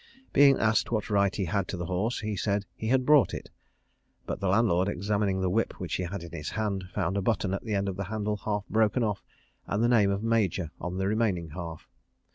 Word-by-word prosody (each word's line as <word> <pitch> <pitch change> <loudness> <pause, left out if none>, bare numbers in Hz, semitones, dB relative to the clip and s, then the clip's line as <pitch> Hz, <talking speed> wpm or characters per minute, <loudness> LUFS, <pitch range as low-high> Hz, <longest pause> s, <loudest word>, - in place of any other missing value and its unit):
Being 140 -1 +6
asked 110 +1 +2
what 110 -1 -1
right 100 -1 +2
he 100 - -1
had 95 +3 -1
to 95 - -4
the 85 - -3
horse, 95 +8 -1
he 105 -1 -2
said 100 +1 -1
he 110 - -5
had 130 +2 +2
bought 145 - +5
it; - - -8 0.7
but - - -4
the 100 - -1
landlord, 95 -2 +3
examining 100 -1 0
a - - +2
whip 110 +5 +1
which 90 - -4
he - - -2
had 90 0 -5
in 85 - -9
his 80 -3 -5
hand, 100 -4 -2
found 95 -1 -1
a - - +1
button 100 -2 0
at 100 - -2
the 110 -2 -2
end 100 0 0
of 95 -1 -3
the 100 - -3
handle 105 0 -2
half 105 -1 -2
broken 110 +3 +2
off, 105 -3 -2 0.4
and 105 +3 0
the - - +4
name 110 -5 +4
of 100 +2 -1
Major 100 -7 +1
on 90 +1 -4
the 95 0 0
remaining 100 -6 0
half. 80 0 -7
100 Hz, 235 wpm, -28 LUFS, 95-110 Hz, 0.7 s, Being